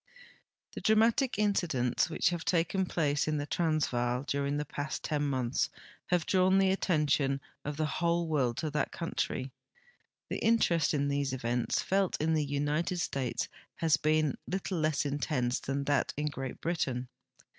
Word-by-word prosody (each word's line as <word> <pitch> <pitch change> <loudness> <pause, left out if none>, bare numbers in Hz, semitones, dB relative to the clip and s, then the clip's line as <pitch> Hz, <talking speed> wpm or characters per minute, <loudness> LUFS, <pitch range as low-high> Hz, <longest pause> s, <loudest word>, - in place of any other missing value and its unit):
The - - -6
dramatic 225 +4 +3
incidents 175 - +1
which 160 - +2
have 175 -2 -3
taken 180 +2 +1
place 150 -5 0
in 155 -1 +1
the 145 - -2
Trans 155 -1 +1
vaal 120 +1 -1
during 140 0 -1
the 150 - -2
past 145 +1 -4
ten 150 -2 -1
months 130 -2 0 0.4
have 175 -3 +1
drawn 190 0 +4
the 195 -1 +4
attention 145 -7 +1 0.2
of 145 0 -4
the 155 - +1
Avhole 170 +3 0
world 135 -7 0
to 155 -2 -2
that 150 -1 -1
country. 135 -5 -3 0.8
The - - -1
interest 170 -10 +3
in 140 0 +1
these 140 -1 0
events 120 -1 0
felt 195 -1 +1
in 160 +1 +1
the 155 -1 +2
United 145 +5 -1
States 135 -7 -1 0.3
has 160 -2 +3
been 155 -2 +2
little 190 -1 -2
less 155 -1 +1
intense 140 -3 0
than 140 +1 -2
that 145 0 0
in 150 +1 0
Great 135 -2 -6
Britain. 130 -7 -1
150 Hz, 160 wpm, -31 LUFS, 140-170 Hz, 0.8 s, drawn